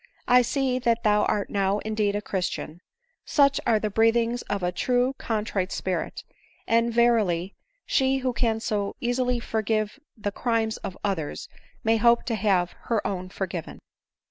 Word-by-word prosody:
" - - -35
I - - +7
see 255 0 0
that 235 -2 +1
thou 210 -1 +3
art 205 - -1
now 195 0 +1
indeed 215 -2 0
a 205 - -2
christian; 180 -4 -3 0.4
such 280 -1 +3
are 225 -2 +4
the 215 0 -2
breath 225 +2 +4
ings 235 +1 0
of 200 -2 -2
a 180 - +1
truly 250 +7 +1
contrite 210 -4 -2
spirit; 185 -3 -3 0.4
and, 230 +1 +2
verily, 215 -7 +2 0.3
she 265 -1 +2
who 255 -1 -1
can 230 -2 0
so 210 -3 -2
easily 245 0 0
forgive 220 +1 -1 0.2
the 205 -1 -3
crimes 225 0 0
of 190 - -7
others 180 -7 -3 0.4
may 225 0 +3
hope 235 +1 +4
to 235 - -1
have 190 -4 +1
her 225 -3 0
own 185 -2 -3
forgiven." 185 -3 -5
220 Hz, 165 wpm, -26 LUFS, 200-235 Hz, 0.4 s, I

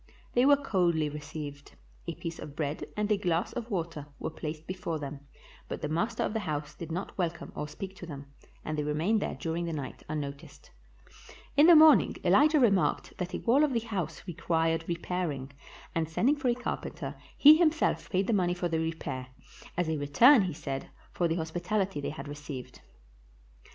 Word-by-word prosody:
They 245 +2 +4
were 285 0 +7
coldly 175 - +1
received; 145 -1 -8 0.3
a - - -3
piece 165 0 -6
of 145 - -8
bread 150 -1 -2
and 210 0 0
a 210 - +4
glass 175 -3 0
of 240 -1 -5
water 165 -7 -3
were - - -4
placed 155 0 -6
before 185 -3 -3
them, 145 -1 -6 0.5
but - - -6
the - - 0
master 175 +9 0
of - - -1
the 220 - 0
house 150 -5 -3
did 165 -1 -8
not 180 +4 -4
welcome 170 -2 -2
or 150 - -3
speak 190 +5 -7
to 175 - -8
them, 140 -3 -7 0.4
and 155 - -2
they 150 - -1
re 150 0 -1
mained 200 +9 +2
there - - -3
during 165 +1 -3
the 165 - -3
night 140 -4 -5
unnoticed. 145 -2 -6 0.8
In 295 +3 +7
the 345 - +9
morn 310 0 +9
ing - - -5
Elijah 305 0 +5
remarked 200 -7 +2
that 180 0 -3
a - - -4
wall 265 +6 +4
of 295 -3 +2
the 235 - +2
house 190 -8 -4
required 165 -2 0
repairing, 170 -6 -3 0.4
and 160 -1 -1
sending 245 - +2
for 290 -3 -2
a 240 - +2
carpenter, 245 - -4 0.2
he 300 +2 +9
himself 325 -1 +2
paid 190 +1 +1
the 230 - +1
money 180 -3 +2
for 175 0 -1
the 165 -1 0
repair, 155 -5 -3 0.5
as 180 -2 +1
a 160 -1 0
return, 230 - +6
he 185 -4 -1
said, 140 -3 -5 0.2
for 175 - +1
the 165 - 0
hospitaHty 175 +2 -1
they - - -2
had 155 0 -7
received. 145 -3 -8
170 Hz, 195 wpm, -29 LUFS, 150-205 Hz, 0.8 s, the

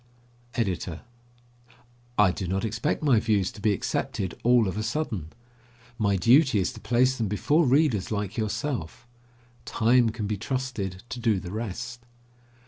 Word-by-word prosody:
EDITOR: 90 -7 -2 1.2
I 105 -3 +5
do 95 0 -4
not 95 +4 -1
expect 110 +8 -1
my 135 -7 +4
views 105 -4 +1
to 105 - -12
be 105 - +3
accepted 100 0 -2
all 120 -2 +4
of 95 - -3
a 110 - -2
sudden. 110 - -2 0.7
My 100 -2 +2
duty 125 - +5
is 95 - 0
to - - -10
place 125 +4 +2
them 110 - 0
before 145 - +2
readers 130 - +2
like 105 0 -2
yourself. 110 - -3 0.6
Time 120 +1 +3
can 110 -1 -4
be 105 0 -2
trusted 110 -5 -4
to 110 - -5
do 115 -4 +2
the 90 -1 -8
rest. 110 +2 -5
110 Hz, 150 wpm, -26 LUFS, 100-120 Hz, 1.2 s, I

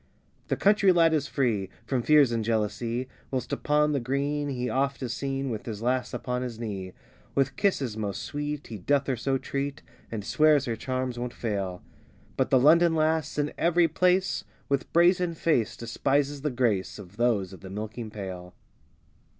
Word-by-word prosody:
The - - 0
country 200 -1 +5
lad 165 -2 +4
is 150 -2 +1
free 115 -11 0 0.2
From 130 -3 0
fears 145 -1 +5
and 115 -1 0
jealousy, 115 +3 -1 0.2
Whilst 130 -2 -3
upon 150 0 +2
the 140 - +1
green 140 +3 -1
he 125 -2 -2
oft 135 +3 -1
is 120 -2 -2
seen, 135 0 -2
With 110 0 -5
his 110 -1 -5
lass 125 +1 0
upon 125 0 -3
his 125 -3 -5
knee. 95 -5 -5 0.4
With 135 -1 +1
kisses 140 - 0
most 105 -3 -3
sweet 145 0 -4
he 110 -3 -7
doth 140 +8 +1
her 135 - 0
so 135 +3 0
treat, 140 +1 -4 0.3
And 105 -3 -5
swears 150 -3 +4
her 115 -3 -2
charms 130 +1 -3
won't 120 0 -4
fail; 100 -5 -3 0.5
But - - +1
the 130 - +5
London 165 +5 +5
lass, 160 0 +1
in 150 0 0
every 170 0 +4
place, 180 +4 +2 0.3
With 140 -1 -1
brazen 175 0 +3
face, 150 -9 +1
despises 140 +4 0
the 150 - 0
grace 120 -7 0
Of 100 -1 -12
those 110 -6 +1
of 95 - -10
the 95 - -9
milking 110 +3 -5
pail. 95 -4 -7
130 Hz, 175 wpm, -27 LUFS, 115-150 Hz, 0.5 s, country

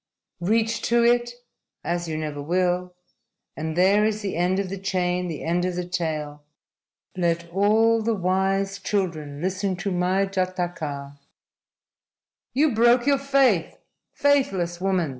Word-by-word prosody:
_ 175 - -2
Reach 225 0 +1
to 235 0 +2
it 240 0 +3 0.5
as 175 0 -2
you 155 -1 -3
never 150 -2 -4
will 180 +3 0 0.6
and 160 +1 -4
there 195 +3 +4
is 215 0 0
the 195 - -3
end 180 +2 +1
of 200 -1 -1
the 195 0 -5
chain, 180 -2 -1
the 160 -4 -5
end 175 +2 0
of 180 -1 -1
the 180 0 -3
tale. 155 -4 -3 0.7
LET 170 -1 0
ALL 220 +4 +3
THE 225 +1 0
WISE 195 +1 0
CHILDREN 165 -8 -3
LISTEN 190 +1 -1
TO 195 +3 -3
MY 185 +2 +1
JATAKA! 175 -7 -3 1.4
"You 295 +2 +3
broke 240 +2 +4
your 280 -1 +3
faith, 270 -10 +2 0.3
faithless 195 -12 +1
woman!" 185 -4 +1
185 Hz, 140 wpm, -24 LUFS, 175-210 Hz, 1.4 s, there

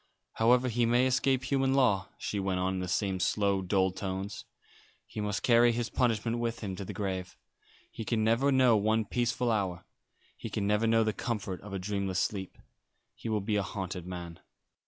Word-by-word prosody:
"However 125 +3 +3
he 120 -1 +1
may 120 +2 +4
escape 130 0 +2
human 135 0 +1
law," 110 -8 +2
she 105 - -3
went 95 -1 -1
on, 95 +1 0
in 95 - -2
the 90 - -3
same 95 +1 0
slow, 100 +1 +1
dull 95 0 +1
tones, 95 +1 -5 0.6
"he 105 - -6
must 105 0 -2
carry 120 0 +5
his 120 0 -2
punishment 115 -1 0
with 115 0 -2
him 100 -4 -4
to 100 - -5
the - - -6
grave. 95 -3 -4 0.5
He 115 - -6
can 110 0 0
never 115 +6 +3
know 130 -3 +5
one 110 +1 +2
peaceful 120 +2 0
hour. 95 -5 -1 0.5
He - - -7
can 100 - -2
never 105 +2 +2
know 115 0 +4
the 110 -1 0
comfort 105 -7 -3
of 100 -1 -5
dreamless 100 -1 -2
sleep. 95 -1 -2 0.6
He 115 - -7
will 105 -2 0
be 105 +1 0
a - - +2
haunted 95 -2 -5
man." 85 -2 -7
105 Hz, 190 wpm, -30 LUFS, 95-120 Hz, 0.6 s, carry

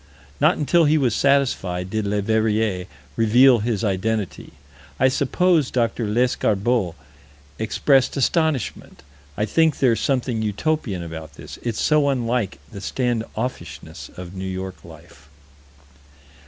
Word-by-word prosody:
Not - - +4
until 165 +3 +3
he 155 +1 +4
was 130 -6 +1
satisfied, 105 -10 +1
did 110 -2 -1
Leverrier 105 -2 0 0.3
reveal 120 +3 +5
his 110 -1 -2
identity. 100 0 -2 0.5
I 130 - +5
suppose 150 +3 +2
Dr. 115 -2 -1
Lescarbault 110 -4 +1 0.6
expressed 130 +5 +2
astonishment. 140 - -1 0.3
I 105 - +1
think 160 +5 +2
there's 120 -4 +2
something 125 -4 0
utopian 110 - -2
about 80 -3 -8
this: - - -10
it's 115 -3 -3
so 150 -2 +3
unlike 120 - -1
the 100 - -8
stand 120 0 -1
offishness 80 - -6
of 90 0 -8
New 95 0 -6
York 95 0 -6
life. 80 -3 -15
110 Hz, 120 wpm, -22 LUFS, 95-130 Hz, 0.6 s, reveal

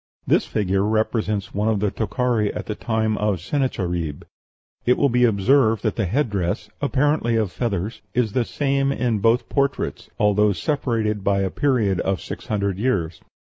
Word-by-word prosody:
This - - +2
figure 100 -2 0
represents 110 -1 0
one 105 +2 0
of 110 -2 +1
the 105 -1 0
Tokhari 115 -1 0
of - - -6
the 105 - -3
time 110 -1 -1
of 105 -3 0
Sennacherib. 90 - -2 0.6
It 125 - +3
will 140 - +3
be 125 0 +3
observed 110 +1 +3
that 110 - 0
the 105 -5 0
headdress 100 -6 -1
(apparently 140 -4 +1
of 110 -5 0
feathers) 105 -1 -3
is 120 -4 +1
the 125 - +2
same 140 +2 0
in 120 -5 0
both 115 +4 +2
portraits, 140 -1 -1
al, 105 -1 +4
though 105 0 +3
separated 110 - -1
by 100 0 +2
a 95 -1 -1
period 115 -10 +1
of 95 0 0
six - - -8
hundred 100 -3 -1
years. 90 -10 -1
110 Hz, 170 wpm, -22 LUFS, 100-125 Hz, 0.6 s, al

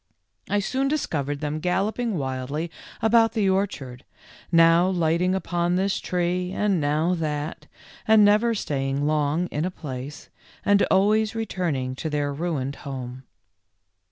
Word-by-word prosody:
I 205 - +1
soon 265 +7 -1
discovered 145 - -2
them 150 0 -2
galloping 200 +5 -1
wildly 140 +4 -3 0.3
about 225 0 +4
the 215 -4 +1
orchard, 145 -10 -2 0.5
now 165 +1 +5
lighting 175 +1 +1
upon 175 -2 0
this 190 +1 0
tree 180 0 -1
and 195 -3 +1
now 155 +4 +1
that, 150 -1 -3 0.4
and 220 -1 +7
never 215 +3 +3
staying 140 -5 -2
long 150 +2 +1
in 150 - -1
a 180 - 0
place, 145 -4 -8 0.4
and 205 0 +4
always 215 +3 +3
returning 170 -12 -2
to 160 - -3
their 145 -1 -1
ruined 140 -4 -3
home. 130 -2 -7
170 Hz, 130 wpm, -24 LUFS, 145-195 Hz, 0.5 s, and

